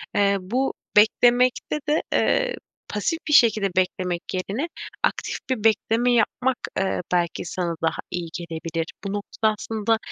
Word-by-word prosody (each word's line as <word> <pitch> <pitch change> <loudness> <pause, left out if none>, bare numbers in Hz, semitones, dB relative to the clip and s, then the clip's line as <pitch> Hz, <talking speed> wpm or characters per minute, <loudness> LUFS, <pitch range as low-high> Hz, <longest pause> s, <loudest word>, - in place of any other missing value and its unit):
eee, 200 -1 +3
bu 250 +9 -1 0.2
beklemekte 245 +6 +4
de, 305 - +3
eee, - - +2 0.3
pasif 265 - -1
bir 300 - +1
şekilde 220 -7 +5
beklemek 180 -2 0
yerine 200 - -2 0.4
aktif - - 0
bir 250 -5 -1
bekleme 225 +2 +3
yapmak, 245 +2 +1 0.2
eee, 195 0 0
belki 175 -1 0
sana 170 -1 -2
daha 160 0 0
iyi 175 -2 -3
gelebilir. 165 -1 -4 0.2
Bu 195 -1 -3
noktada 215 +1 0
aslında 225 0 0
210 Hz, 135 wpm, -24 LUFS, 180-245 Hz, 0.4 s, şekilde